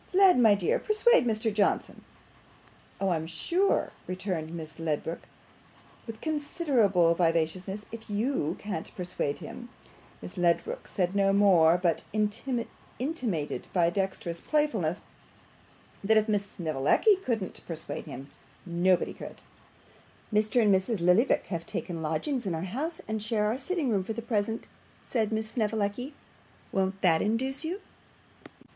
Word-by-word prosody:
Led, 375 -6 +6
my 220 -4 +6
dear, 190 -4 +1
persuade 430 - +3
Mr 220 -1 0
Johnson.' 205 -1 0 1.0
'Oh, 195 - +1
I'm 160 -2 -1
sure,' 345 - +1 0.2
returned 180 -4 -3
Miss 160 -1 -8
Ledrook, 160 +1 -2 0.9
with 225 -1 -7
considerable 265 - +2
vivacity, 170 +3 0
'if 225 -1 -9
YOU 205 - 0
can't 195 -6 -5
persuade 175 -5 -2
him - - -9 0.3
' - - -26
Miss 90 - -9
Ledrook 180 - 0
said 180 -2 -1
no 195 -1 +4
more, 180 -5 +6
but 175 -2 0
intimated, 230 - -3
by 175 -2 +4
a 170 - +2
dexterous 190 -3 -2
playfulness, 220 - 0 1.0
that 220 +2 +4
if 215 +1 +3
Miss 205 -2 0
Snevellicci 160 - +2
couldn't 230 - -3
persuade 165 0 -6
him, 140 -1 -8 0.3
nobody 175 +1 +2
could. - - -10 0.9
'Mr. 215 +3 +3
and 205 -2 +5
Mrs. 190 +3 +1
Lillyvick 180 +9 +3
have 165 -2 -4
taken 170 -2 -4
lodgings 195 - -1
in 175 - 0
our 160 - -3
house, 285 - -3
and 220 0 -2
share 215 -1 0
our 220 +4 +1
sitting 305 -3 -1
room 195 -3 +1
for 220 - -4
the 230 +1 -5
present,' 225 -1 -1 0.4
said 220 -3 -1
Miss 220 0 -2
Snevellicci. 220 +4 -1 0.6
'Won't 190 0 0
that 165 -3 +4
induce 260 +7 0
you? 355 +6 -3
205 Hz, 140 wpm, -29 LUFS, 175-235 Hz, 1.0 s, Led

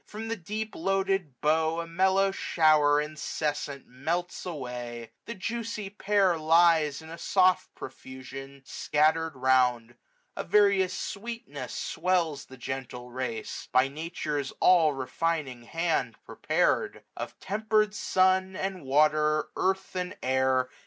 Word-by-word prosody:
From 220 +1 -6
the 230 - -1
deep 215 +3 -5
loaded 195 -6 -1
bough 160 +2 +2
a 170 - -3
mellow 190 +3 +2
shower 155 -5 +3
Incessant 150 -2 -3
melts 170 +9 -3
away. 125 -6 -6
The 235 - -6
juicy 220 0 -4
pear 205 -1 +2
630 160 -2 -6
Lies, 160 -2 +4
in 160 - -11
a 165 - -8
soft 185 -1 +2
profusion, 130 +1 -9
scattered 155 +4 +1
round. 125 -2 +2 0.4
A - - -3
various 200 -1 +3
sweetness 200 - -6
swells 170 -6 -1
the 130 - -13
gentle 125 -1 -6
race 120 -3 -4
j - - -27
By 130 +1 +4
Nature's 150 -2 -4
all 165 -5 +5
refining 135 -2 -2
hand 165 -7 -1
prepared; - - 0
Of - - -7
temper'd 215 +1 +1
sun, 190 -1 +2
and 190 -3 -4
water, 150 +2 +2
earth, 190 0 -1
and 180 0 -3
air. 130 0 +2
160 Hz, 125 wpm, -28 LUFS, 135-190 Hz, 0.4 s, all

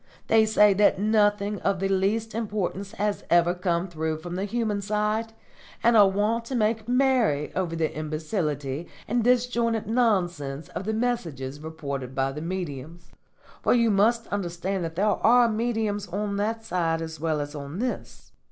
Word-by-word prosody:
They 220 -1 +4
say 210 -1 +5
that 200 0 +4
nothing 205 0 +2
of 195 - 0
the 195 - 0
least 200 +3 0
importance 205 -3 -3
has 205 0 -2
ever 175 0 +4
come 180 0 -1
through 160 -2 -3
from 175 +2 -7
the 190 +2 -2
human 215 -2 -1
side, 210 +2 -1 0.5
and 235 0 +5
are 205 -3 +7
wont 210 +4 0
to 260 - -4
make 220 -1 0
merry 250 - +2
over 180 -3 -2
the 160 -1 -1
imbecility 155 -1 -3 0.2
and 240 +1 +1
disjointed 235 -2 +1
nonsense 175 - 0
of 195 - -6
the 220 - -1
messages 165 - -2
reported 140 -5 -6
by 135 0 0
the 150 +3 -6
mediums; 170 -2 -6 0.5
for - - +3
you 235 -2 +3
must 225 +4 +3
understand 185 -1 -2
that 165 0 -6
there 195 +5 +1
are 235 +3 +4
mediums 220 -2 -1
on 200 +2 -3
that 225 +2 -2
side 165 -5 0
as 160 -1 -7
well 155 -1 0
as 145 0 -4
on 145 +2 -7
this. 250 +3 -5
200 Hz, 165 wpm, -26 LUFS, 165-220 Hz, 0.5 s, are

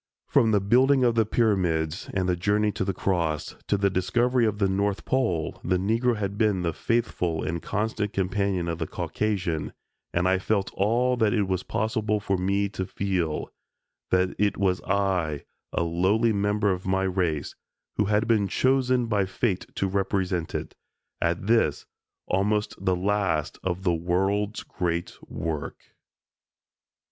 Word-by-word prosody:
From 115 - +3
the 105 -2 +4
building 130 +7 +4
of 120 -1 +4
the 115 -2 +2
pyramids 90 -8 +1
and 95 -1 +1
the 90 - +2
journey 105 +4 +1
to - - -2
the 95 - 0
Cross, 85 -5 -1
to 100 - +2
the 100 0 +2
discovery 120 +7 +2
of 105 -1 -1
the 100 -1 +2
North 100 +1 -1
Pole, 100 -12 0
the 90 +1 +1
Negro 115 +5 +1
had 100 0 -3
been 105 -5 +2
the 85 -1 0
faithful 90 -8 -1
and 85 +1 -2
constant 105 0 -2
companion 95 -2 0
of 85 0 -3
the 80 - -2
Caucasian, 95 -7 -2 0.4
and 90 +1 +1
I 95 0 +3
felt 100 0 -1
all 120 +5 +2
that 110 0 +2
it 105 - +2
was 95 -1 0
possible 105 0 -1
for 100 -1 -1
me 100 +2 +1
to 95 -2 -4
feel, 90 -6 -2 0.6
that 90 0 +2
it 105 0 +2
was 95 -2 +1
I, 95 -6 0 0.3
a - - 0
lowly 95 +7 +2
member 105 0 +1
of 90 0 -3
my 95 0 +1
race, 90 -6 -1 0.4
who 105 - +3
had 105 +2 +1
been 110 -4 +3
chosen 130 +2 +2
by 105 -4 +1
fate 95 0 -1
to 100 - 0
represent 95 -3 -1
it, - - -4 0.5
at 85 +2 0
this, 110 -9 +2 0.4
almost 105 +3 0
the 95 - +2
last 95 -4 0
of 95 0 -2
the 90 -3 +2
world's 95 +5 0
great 85 -2 -3
work. 80 -2 -5
100 Hz, 160 wpm, -26 LUFS, 90-105 Hz, 0.6 s, the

